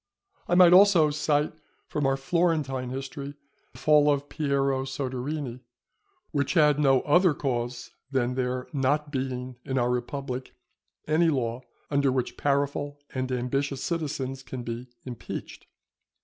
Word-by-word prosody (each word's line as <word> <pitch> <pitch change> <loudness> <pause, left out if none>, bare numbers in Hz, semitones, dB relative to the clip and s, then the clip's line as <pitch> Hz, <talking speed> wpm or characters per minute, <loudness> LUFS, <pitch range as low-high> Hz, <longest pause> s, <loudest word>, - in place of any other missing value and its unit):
I 175 - +2
might 175 -1 +8
also 180 -5 +6
cite 150 0 +1 0.3
from 145 -2 -1
our 135 0 +1
Florentine 140 -4 0
history 135 +2 -6 0.4
the - - -15
fall 150 -1 +5
of 145 0 -1
Piero 140 -3 0
Soderini, 135 0 -4 0.7
which 140 +2 0
had 150 -3 +5
no 135 -3 +4
other 175 +1 +4
cause 120 -3 -3 0.2
than 125 -2 0
there 125 0 -2
not 145 +2 0
being 130 -2 -3
in 135 - -2
our 120 -1 +2
republic 130 +1 -4 0.5
any 160 +2 +3
law 125 -4 -1 0.3
under 140 -1 +3
which 130 -1 -1
powerful 145 0 -1 0.2
and 130 -1 -2
ambitious 135 +2 -1
citizens 135 -5 -3
can 130 -1 -7
be 120 +2 -6 0.2
impeached. 125 -3 -7
135 Hz, 135 wpm, -27 LUFS, 130-150 Hz, 0.7 s, might